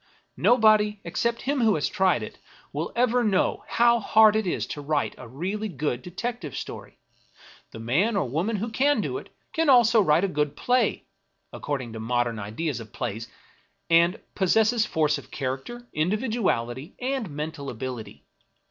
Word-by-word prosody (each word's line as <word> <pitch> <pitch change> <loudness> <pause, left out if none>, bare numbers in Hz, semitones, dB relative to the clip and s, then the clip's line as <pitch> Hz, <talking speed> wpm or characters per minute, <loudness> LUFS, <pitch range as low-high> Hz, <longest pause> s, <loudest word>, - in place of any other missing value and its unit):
Nobody, 215 -3 +4
except 230 +7 -2
him 275 0 0
who 220 -3 +4
has 150 - 0
tried 185 - +1
it, - - -9 0.3
will 150 +4 -3
ever 245 0 +2
know 200 -4 +1
how 235 0 +4
hard 220 0 +5
it 220 -3 0
is - - -1
to 145 - -6
write 145 0 -1
a 125 - -11
really 190 - -3
good 140 -6 -2
detective 180 - -5
story. - - -8 0.7
The - - -11
man 150 - +1
or 190 -9 0
woman 170 - -1
who 220 +3 -3
can 280 +6 +2
do - - -2
it - - -14 0.2
can 325 -2 +1
also 240 -3 +6
write 165 -1 +3
a - - +3
good 150 -5 -1
play 250 0 +1 0.5
(according 130 -6 -4
to 110 - -6
modern 120 0 -1
ideas 120 +8 -3
of 110 -1 -10
plays), 115 -2 -4 0.6
and 170 +3 +4
pos 190 -3 +1
sesses 220 0 +3
force 150 -2 +1
of - - -15
character, 140 - -5
individuality, 175 - -1
and 255 -5 -2
mental 150 -1 -5
ability. 120 -3 -7
180 Hz, 165 wpm, -25 LUFS, 135-225 Hz, 0.7 s, also